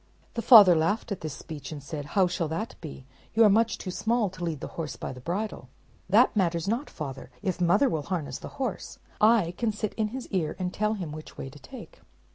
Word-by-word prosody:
The 230 - -2
father 210 -7 +9
laughed 170 +8 0
at 200 - -3
this 155 -4 -5
speech, 145 -3 -8
and 145 -3 -7
said, 145 0 -5
"How 190 - +6
shall 180 -2 -1
that 165 +9 -4
be? 145 -5 -9 0.3
You 225 - +6
are 210 - +7
much 225 +2 +3
too 185 - -5
small 220 0 0
to 185 -1 -8
lead 165 -4 -2
the - - -6
horse 155 -5 -4
by - - -6
the 125 - -10
bridle." 175 - -4 0.4
"That 225 +6 +5
matters 170 -3 +1
not, 235 +8 -1
father. 135 -3 -7
If 185 -3 -2
mother 175 +11 +4
will 160 - -1
harness 150 -9 -3
the - - -8
horse, 255 -7 -4 0.5
I 170 +1 -5
can 230 -2 +1
sit 215 0 -3
in 220 -1 +1
his 255 +3 -6
car, 170 -6 -1
and 180 -1 -3
tell 215 +1 0
him 180 -7 -5
which 155 +1 -10
way 135 - -6
to 145 - -14
take." 270 - -12
180 Hz, 230 wpm, -27 LUFS, 155-215 Hz, 0.5 s, father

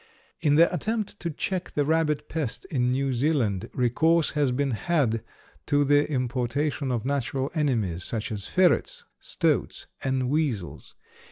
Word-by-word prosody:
] - - -36
In 145 - +5
the 170 +3 +5
attempt 215 +2 -2
to 170 - -3
check 180 +4 -3
the 145 - +2
rabbit 155 -1 +1
pest 155 -8 -3
in 125 -4 +1
New 135 +1 0
Zealand, 120 - 0
recourse 160 +7 +2
has 145 -3 +1
been 135 +2 0
had 120 -4 0 0.4
to 145 -1 +3
the 145 +1 +3
importation 130 +2 -1
of 120 -1 -2
natural 135 0 -1
enemies, 115 - 0
such 110 +2 -3
as 100 -3 -4
ferrets, 475 - +2
stoats, - - -1 0.2
and 130 -1 0
weasels. 135 - -2
140 Hz, 150 wpm, -26 LUFS, 125-155 Hz, 0.4 s, In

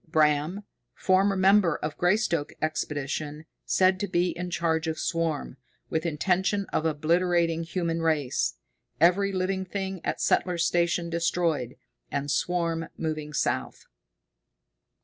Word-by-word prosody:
Bram, 155 +5 +2 0.3
former 195 +1 +3
member 190 -3 +4
of 150 0 -4
Greystoke 175 -5 +1
Expedition, 150 0 -3 0.2
said 185 0 +3
to 205 - -1
be 175 -1 +1
in 180 +1 -5
charge 165 -2 0
of 160 0 -2
swarm, 165 - -2 0.3
with 160 +1 0
intention 185 +5 +1
of 160 - +1
obliterating 165 +2 +1
human 165 -1 -2
race. 150 - 0 0.4
Every 185 +5 +4
living 190 0 -1
thing 190 -1 -4
at - - -2
Settler's 175 -1 +1
Station 170 0 +1
destroyed, 165 -6 0 0.4
and 140 0 -2
swarm 165 +1 0
moving 155 -2 -3
south. 150 - -2
170 Hz, 120 wpm, -27 LUFS, 155-185 Hz, 0.4 s, member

